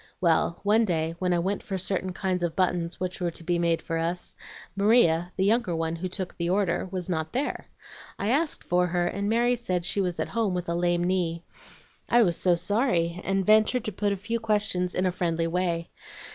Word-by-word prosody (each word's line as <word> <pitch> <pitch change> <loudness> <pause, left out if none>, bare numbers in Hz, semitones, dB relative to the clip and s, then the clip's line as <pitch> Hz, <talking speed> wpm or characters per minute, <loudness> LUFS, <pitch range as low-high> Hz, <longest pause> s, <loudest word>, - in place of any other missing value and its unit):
Well, 170 0 +2
one 215 +3 +4
day 165 -5 0
when 180 -1 0
I 175 - +3
went 190 +4 -1
for 195 - -4
certain 185 0 -2
kinds 185 -1 -2
of 170 -2 -1
buttons 175 -2 0
which 180 0 -4
were 175 - +1
to 165 - -8
be 175 +1 0
made 170 -1 +1
for 165 -1 -2
us, 170 +2 -3 0.4
Maria, 195 -5 +3
the 190 - +2
younger 210 -4 +2
one, 165 0 -2
who 185 +2 -4
took 185 0 -5
the 170 0 -2
order, 185 -2 +1
was 185 -2 -3
not 160 -3 -2
there. 275 +4 -2 0.5
I 200 - -2
asked 295 +5 0
for 180 0 +2
her, 175 0 0
and 200 +3 -2
Mary 240 +2 +3
said 185 -7 -2
she 200 +2 0
was 180 -3 -2
at - - -2
home 220 -5 0
with 180 -1 -3
a 170 - -1
lame 175 0 +1
knee. 175 -2 0 0.7
I 240 0 +6
was 175 -5 +1
so 180 0 +2
sorry, 180 -4 0
and 195 0 0
ventured 215 +3 +4
to 215 - -2
put 205 +1 -1
a 200 - -1
few 230 +4 -3
questions 205 -5 0
in 185 - +1
a 185 - +2
friendly 170 -2 -1
way. 170 -1 -1
180 Hz, 215 wpm, -26 LUFS, 170-205 Hz, 0.7 s, I